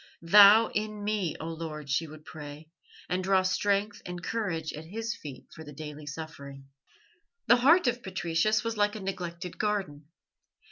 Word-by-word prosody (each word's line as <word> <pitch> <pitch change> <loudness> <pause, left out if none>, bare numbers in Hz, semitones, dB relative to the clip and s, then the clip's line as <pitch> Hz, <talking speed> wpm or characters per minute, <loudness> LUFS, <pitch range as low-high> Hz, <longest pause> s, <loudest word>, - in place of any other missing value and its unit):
"Thou 205 +5 +8
in 210 0 -3
me, 205 -6 -1
O - - -6
Lord," 160 -3 -6
she 140 +4 0
would 155 0 -13
pray, 150 0 -10 0.4
and 185 +1 -1
draw 190 0 +3
strength 200 +2 0
and 180 -1 -7
courage 170 -9 -2
at 155 +1 -8
His 225 +6 -4
feet 140 -4 -10
for 160 - -10
the 150 - -10
daily 150 0 -8
suffering. 140 -3 -8 0.8
The 240 - +6
heart 315 +8 +5
of 245 0 0
Patricius 190 +3 0
was 230 -1 -3
like 205 0 +2
a - - -5
neglected 180 -2 -5
garden. 190 -9 -2
180 Hz, 160 wpm, -29 LUFS, 155-210 Hz, 0.8 s, Thou